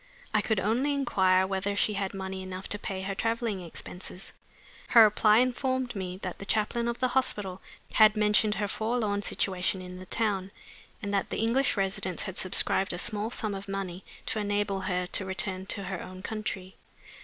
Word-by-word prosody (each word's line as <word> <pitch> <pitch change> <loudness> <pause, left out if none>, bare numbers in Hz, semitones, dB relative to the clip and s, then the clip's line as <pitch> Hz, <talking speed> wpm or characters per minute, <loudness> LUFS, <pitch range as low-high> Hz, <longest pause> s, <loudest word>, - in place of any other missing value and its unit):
I 215 - +4
could 215 -1 +1
only 235 +9 +1
inquire 190 -9 +3
whether 195 +1 -1
she 210 +1 +2
had 195 -1 -2
money 190 0 -4
enough 185 0 -6
to 210 - -1
pay 190 -2 -4
her 195 +1 -2
traveling 225 -1 -1
expenses. 180 +2 -7 0.5
Her 230 -2 +8
reply 210 0 +5
informed 255 0 +1
me 185 -2 -4
that 180 -2 -4
the - - -6
chaplain 220 +3 0
of 235 0 -1
the 255 0 +1
hospital 205 -8 -1 0.3
had 215 0 +6
mentioned 210 0 +3
her 205 +1 -1
forlorn 220 -1 -1
situation 190 -1 0
in 180 0 -8
the 185 - -10
town, 200 -4 +1 0.5
and 205 0 -2
that 200 - 0
the - - -3
English 230 +3 +2
residents 195 -2 0
had 190 - -5
subscribed 190 +1 +3
a - - -3
small 210 +2 0
sum 215 -3 -2
of 195 +1 -6
money 195 -2 -4 0.2
to 220 - -2
enable 205 -1 0
her 180 -1 -1
to 185 - 0
return 190 0 -3
to 200 - 0
her 190 -1 -4
own 185 0 -9
country. 200 -4 -4
200 Hz, 185 wpm, -29 LUFS, 190-220 Hz, 0.5 s, Her